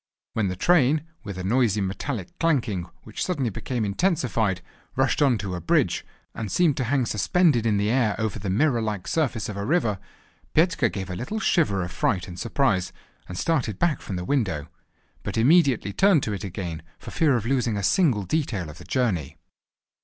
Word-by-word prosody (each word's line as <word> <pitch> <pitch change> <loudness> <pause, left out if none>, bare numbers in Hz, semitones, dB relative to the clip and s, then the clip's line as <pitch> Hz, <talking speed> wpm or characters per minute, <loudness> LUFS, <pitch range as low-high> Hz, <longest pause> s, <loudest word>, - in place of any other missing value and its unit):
When 110 -3 0
the 90 - -2
train, 155 - +3 0.2
with 100 -4 -6
a 90 - -4
noisy 110 0 +2
metallic 100 +2 -3
clanking, 115 - 0
which 110 - -5
suddenly 140 -10 -1
became 120 +3 -3
intensified, 110 - 0 0.3
rushed 135 +2 +1
on 135 -5 +4
to 95 -2 -4
a 90 - -4
bridge, 85 - +1 0.3
and 110 -3 -5
seemed 170 -6 +3
to 130 - 0
hang 130 +1 +1
suspended 120 - +2
in 105 -2 +2
the 105 +2 +1
air 115 -5 +2
over 110 -2 -2
the 100 0 -4
mirror 120 +4 +2
like 105 -4 -3
surface 130 -8 0
of 105 - -6
a 100 - -3
river, 110 - +1 0.6
Petka 160 -7 +3
gave 95 -2 -5
a - - -3
little 135 - -4
shiver 125 - +2
of 90 - -5
fright 95 -3 0
and 90 0 -8
surprise, 115 -6 +1 0.4
and 90 - -6
started 125 - 0
back 160 0 +1
from 95 - -5
the 90 0 -4
window; 95 - -1 0.5
but - - -4
immediately 130 - +4
turned 190 - +4
to 105 - -2
it 100 - -5
again, 90 -4 -5 0.2
for - - -10
fear 155 -6 +3
of 115 - -4
losing 120 -4 +1
a 100 - -3
single 130 - +3
detail 105 - -2
of 75 - -14
the - - -11
journey. 100 - -1
115 Hz, 190 wpm, -25 LUFS, 95-140 Hz, 0.6 s, on